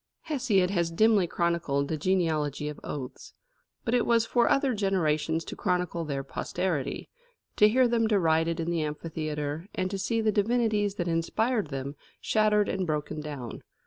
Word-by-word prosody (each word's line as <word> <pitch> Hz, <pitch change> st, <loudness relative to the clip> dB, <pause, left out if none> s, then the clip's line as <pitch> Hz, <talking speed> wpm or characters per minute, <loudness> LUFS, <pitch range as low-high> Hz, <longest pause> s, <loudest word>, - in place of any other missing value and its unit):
Hesiod 240 Hz, -, +1 dB
has 170 Hz, -4 st, +1 dB
dimly 205 Hz, +1 st, +3 dB
chronicled 165 Hz, -5 st, 0 dB
the 160 Hz, -, -1 dB
genealogy 155 Hz, -4 st, 0 dB
of 150 Hz, -, -6 dB
oaths. 130 Hz, -4 st, -7 dB, 0.5 s
But 230 Hz, -, 0 dB
it 245 Hz, -, +3 dB
was 230 Hz, -1 st, +3 dB
for 235 Hz, +1 st, +2 dB
other 275 Hz, -2 st, +2 dB
generations 165 Hz, -6 st, 0 dB
to -, -, -6 dB
chronicle 180 Hz, -3 st, -1 dB
their 140 Hz, -2 st, -3 dB
posterity, 150 Hz, +1 st, -3 dB, 0.5 s
to 210 Hz, -, +7 dB
hear 255 Hz, +3 st, +4 dB
them 230 Hz, -1 st, +2 dB
derided 165 Hz, -5 st, +2 dB
in 165 Hz, +1 st, -1 dB
the 170 Hz, -2 st, 0 dB
amphitheatre, 150 Hz, +1 st, -4 dB
and 185 Hz, 0 st, -1 dB
to 195 Hz, -, -3 dB
see 225 Hz, +4 st, 0 dB
the 220 Hz, -1 st, +2 dB
divinities 210 Hz, -1 st, +1 dB
that 175 Hz, -3 st, -2 dB
inspired 205 Hz, +6 st, 0 dB
them 135 Hz, 0 st, -5 dB, 0.2 s
shattered 210 Hz, -1 st, +2 dB
and 190 Hz, -2 st, -2 dB
broken 150 Hz, 0 st, -2 dB
down. 145 Hz, -6 st, -7 dB
175 Hz, 160 wpm, -28 LUFS, 155-215 Hz, 0.5 s, to